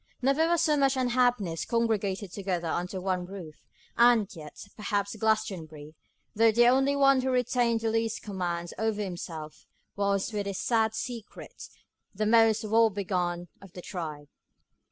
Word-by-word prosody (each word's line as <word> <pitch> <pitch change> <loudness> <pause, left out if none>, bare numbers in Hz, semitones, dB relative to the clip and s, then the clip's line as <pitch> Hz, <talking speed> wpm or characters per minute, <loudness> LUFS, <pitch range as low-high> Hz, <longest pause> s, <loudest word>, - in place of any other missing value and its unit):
Never 275 +5 +2
was 340 -1 +2
so 305 -3 +3
much 275 -1 +2
unhappiness 245 -9 +1
congregated 210 -5 -1
together 185 -4 -3
under 180 +3 -3
one 180 -1 -2
roof; 180 -5 -10 0.3
and 235 -3 +5
yet, 150 +2 -10
perhaps 205 -1 -2
Glastonbury, 185 -9 -2 0.4
though 225 +1 +4
the 240 +2 +5
only 270 +2 +3
one 275 -1 +4
who 260 - -1
retained 245 -2 +1
the 225 -1 0
least 225 0 -1
command 175 -4 -4
over 220 -1 0
himself, 165 -5 -6 0.3
was, 200 +2 0
with 205 -1 -2
his 195 -1 -3
sad 220 -2 +1
secret, 230 -2 -7 0.5
the 215 +2 -1
most 225 0 +4
woe 225 +1 +4
begone 180 -3 -2
of 195 -2 -14
the 180 - -8
tribe. 155 -5 -6
210 Hz, 150 wpm, -28 LUFS, 180-235 Hz, 0.5 s, and